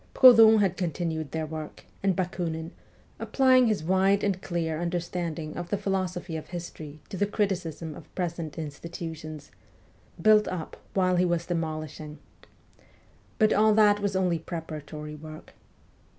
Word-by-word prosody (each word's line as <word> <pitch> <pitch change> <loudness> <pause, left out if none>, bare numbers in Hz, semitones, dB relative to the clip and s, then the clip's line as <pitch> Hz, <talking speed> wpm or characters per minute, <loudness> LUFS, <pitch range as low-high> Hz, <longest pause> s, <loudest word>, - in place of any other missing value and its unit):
Proudhon 225 -4 +8
had 185 -2 +1
continued 160 -3 -2
their 160 -1 -2
work, 155 0 -7 0.2
and 195 -2 +2
Bakunin, 170 -3 -3 0.5
applying 255 -2 +4
his 210 -7 0
wide 190 +3 +3
and 195 -2 0
clear 165 -3 -2
understanding 170 -2 -3
of 175 0 -5
the 205 - 0
philosophy 185 -3 -2
of 155 - -6
history 160 -4 -8
to 190 - -5
the 205 - +1
criticism 180 -7 -2
of - - -14
present 170 -4 -3
institutions, 155 0 -7 0.3
' - - -31 0.3
built 210 +4 +5
up 180 -4 -5 0.2
while 185 -2 +3
he 180 - +3
was 170 -1 0
demolishing.' 155 -3 -4 1.2
But 215 -2 +4
all 215 0 +4
that 210 -1 +5
was 200 -1 -1
only 180 -3 +1
preparatory 155 -2 -7
work. 155 +1 -11
175 Hz, 140 wpm, -27 LUFS, 160-195 Hz, 1.2 s, Proudhon